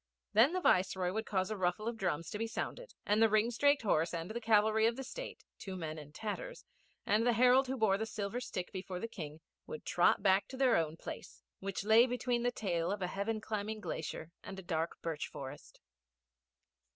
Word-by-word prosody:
Then 235 - +6
the 370 - +1
Viceroy 185 - +2
would 220 +1 -2
cause 190 0 0
a - - -1
ruffle 185 +3 -1
of 235 - -1
drums 175 -6 -2
to 210 - -4
be 225 - -1
sounded, - - -5
and 210 +2 +2
the 225 - +6
ringstraked 235 +6 +3
horse 170 -4 +2
and 165 +4 -4
the 235 +2 -4
cavalry 220 0 +4
of 230 - 0
the 270 - -5
State - - -7 0.2
two 190 -2 -6
men 160 -3 -5
in 150 -1 -11
tatters 225 - -5 0.4
and 215 +2 +3
the 240 0 +3
herald 250 +3 +5
who 265 +1 -2
bore 205 -4 +3
the 220 - -2
silver 210 +2 -3
stick 185 -7 -5
before 185 -1 -5
the 230 - -3
King, 155 -7 -8 0.3
would 470 - -7
trot - - +3
back 195 0 +4
to 265 - -8
their 260 -2 +4
own 160 -1 0
place, - - -9 0.2
which 195 0 -3
lay 220 +4 +6
between 245 -1 0
the 245 - +2
tail 175 -6 -1
of 200 -2 -2
a 180 - -3
heaven 215 +3 -1
climbing 215 0 -3
glacier 160 -3 -5
and 195 - -8
a 190 - -7
dark 165 -1 -2
birch 160 -3 -2
forest. 135 +1 -9
210 Hz, 210 wpm, -34 LUFS, 180-230 Hz, 0.4 s, Then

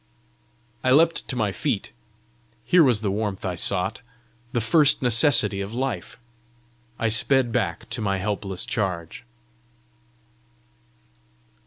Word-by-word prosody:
I 130 - +1
leapt 165 +5 +3
to 130 - -4
my 110 -4 0
feet: 115 -1 -3 0.7
here 180 -2 +5
was 120 -7 +2
the 100 -3 -1
warmth 100 -2 -3
I 90 - -2
sought 95 +5 -1 0.5
the 120 - 0
first 135 +5 +3
necessity 115 -5 +4
of 100 +4 -6
life! 125 -9 -4 0.8
I 115 - 0
sped 120 +2 +2
back 115 -3 -2
to 120 -1 -2
my 100 -2 0
helpless 95 -1 -3
charge. 90 -6 -3
110 Hz, 120 wpm, -24 LUFS, 100-130 Hz, 0.8 s, here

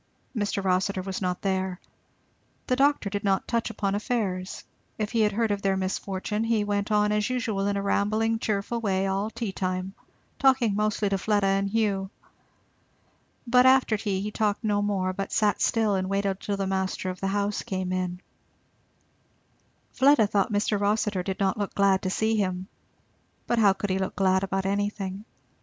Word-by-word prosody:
Mr. 205 -2 -1
Rossitur 185 0 0
was 190 0 -4
not 180 -1 -2
there. 190 -1 -1 0.9
The 255 - +1
doctor 280 -4 +2
did 200 +1 -3
not 195 -2 +1
touch 235 -1 0
upon 200 -3 -2
affairs, 200 -4 -2 0.3
if 215 -1 -2
he 230 -2 +2
had 210 -1 +3
heard 220 +1 0
of 200 -1 -1
their 195 -1 +1
misfortune; 190 +2 -2
he 225 -2 +1
went 205 +1 -1
on 210 0 +3
as 210 +2 +1
usual 220 -6 -1
in 200 0 0
a 200 - -2
rambling 215 +3 +1
cheerful 215 +2 -2
way 195 -3 0
all 195 +2 -1
tea 230 -2 -4
time, 185 0 -3 0.5
talking 260 -6 +3
mostly 210 0 0
to 195 -1 0
Fleda 205 0 +1
and 195 0 +1
Hugh. 200 -3 0 1.4
But 250 +1 +5
after 260 -4 +4
tea 200 -3 -2
he 210 +1 -3
talked 210 0 0
no 205 -1 +1
more 195 -2 0
but 195 +1 -4
sat 210 -3 +1
still 220 -3 +2
and 190 -1 -1
waited 195 -1 0
till 200 -1 -3
the 195 - -1
master 190 -1 -2
of 180 - -9
the 195 - 0
house 205 +1 -1
came 185 -4 -3
in. 180 -1 -2 1.7
Fleda 275 -4 +5
thought 205 +1 0
Mr. 205 0 +1
Rossitur 205 -2 +1
did 190 +1 -4
not 195 +1 +1
look 205 - -3
glad 195 -1 +3
to 185 - -2
see 220 +3 +1
him. 185 -3 -1 0.8
But 240 - +1
how 200 -3 +6
could 200 0 -3
he 190 - 0
look 190 - -3
glad 190 0 +2
about 195 0 -1
anything? 200 0 -2
200 Hz, 180 wpm, -26 LUFS, 190-215 Hz, 1.7 s, how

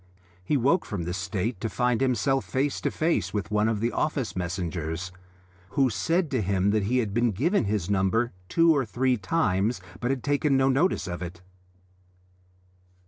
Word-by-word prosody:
He 145 +10 +1
woke 140 +8 +2
from 100 -7 -4
this 90 +3 -3
state 95 +2 -3
to 115 - -1
find 125 0 0
himself 135 0 +1
face 135 +8 -1
to - - 0
face 160 -7 0
with 100 -2 -3
one 105 +1 +2
of 110 -2 -1
the 120 +1 +1
office 140 -7 -1
messengers, 90 -1 -3 0.7
who 135 -3 +4
said 165 - 0
to 130 -4 +1
him 100 0 +1
that 105 -2 +1
he 125 +5 +1
had 110 -5 0
been 120 +2 +2
given 145 - +1
his 100 -3 -1
number 100 +4 +1 0.2
two 165 -1 +4
or 140 - +2
three 125 +2 +1
times 110 - 0 0.2
but 120 - -1
had 135 -2 -1
taken 145 -1 +2
no 135 0 +3
notice 145 +8 +2
of 90 -1 -5
it. 90 0 -7
115 Hz, 180 wpm, -26 LUFS, 95-135 Hz, 0.7 s, who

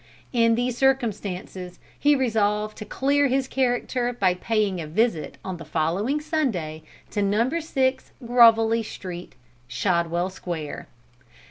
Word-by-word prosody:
In 230 -1 +4
these 245 +1 -1
circumstances, 200 -8 -1 0.2
he 290 0 +4
resolved 215 -4 0
to 215 - -6
clear 280 +4 +2
his 265 0 0
character 245 -1 0
by 195 -7 +2
paying 200 -1 0
a 155 - -6
visit 175 0 0
on 185 -2 -4
the 165 - -9
following 170 - 0
Sunday 245 - -2 0.3
to 205 - -1
Number 230 +11 +1
6 265 -4 -1
Grovelly 230 -1 +5
Street, 180 -5 -8 0.3
Shadwell 170 +6 0
Square. 165 -5 -6
220 Hz, 125 wpm, -24 LUFS, 180-255 Hz, 0.3 s, Grovelly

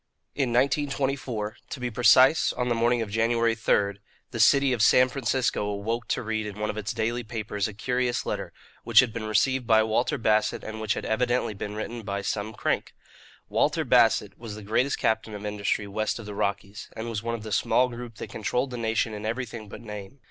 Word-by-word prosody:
GOLIAH 140 - +1
In 120 - -3
1924 130 -4 0
to 140 - -6
be 125 -1 -3
precise, 130 +5 +5
on 125 0 -2
the - - +3
morning 120 0 +2
of 105 - -8
January 115 +1 +2
3 100 -3 +1 0.3
the 115 - -5
city 140 +4 +5
of 120 - -1
San 125 +3 +6
Francisco 130 -3 0
awoke 110 +3 -3
to - - -1
read 110 -1 -2
in 105 -1 -7
one 105 0 -1
of - - -11
its 105 -1 -3
daily 115 +2 -1
papers 110 -3 -3
a 110 - -8
curious 125 +1 -1
letter, - - -3 0.3
which - - +6
had 125 -4 +4
been 115 -2 -4
received 125 +4 +1
by 110 -1 +5
Walter 110 0 0
Bassett 110 -1 +1
and 110 0 -6
which 110 -1 0
had - - -5
evidently 120 0 0
been 105 +1 -6
written 115 +2 -5
by 100 -1 -4
some 105 +1 -2
crank. - - -2 0.5
Walter - - +1
Bassett - - +3
was 115 -3 -7
the 110 - -9
greatest 125 +7 +1
captain 110 -1 0
of 105 0 -7
industry 105 0 -1
west 105 +2 -2
of 115 - -9
the 105 - -7
Rockies, 100 0 -3
and 115 +1 -5
was 110 -3 -3
one 115 +1 -2
of 110 - -8
the 110 - -7
small 125 +5 +3
group 120 -2 -8
that - - -8
controlled 125 +4 -1
the 125 - -5
nation 115 -1 0
in 105 0 -6
everything 115 -1 -4
but - - -9
name. 105 +3 -9
110 Hz, 215 wpm, -26 LUFS, 105-125 Hz, 0.5 s, San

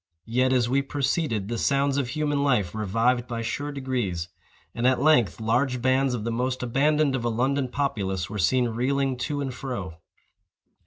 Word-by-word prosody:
Yet, 125 +3 +1
as 125 -3 +3
we 135 +3 +2
proceeded, 135 - -1
the 115 0 -3
sounds 140 0 +1
of 135 - -1
human 145 +1 -1
life 120 -11 +1
revived 115 +4 +1
by 115 -2 -4
sure 145 +6 -3
degrees, 120 -11 -3 0.4
and 120 +1 +1
at 130 -1 +3
length 140 - +3
large 125 +3 +1
bands 130 +1 +2
of 110 - -4
the 115 - -2
most 125 +2 -1
abandoned 140 +3 +2
of 125 - -3
a 120 - +1
London 130 +4 0
populace 100 -10 -2
were 105 0 -5
seen 125 +6 +2
reeling 135 +3 0
to 145 +3 -2
and 135 -2 -3
fro. 110 -11 -5
125 Hz, 175 wpm, -25 LUFS, 115-140 Hz, 0.4 s, as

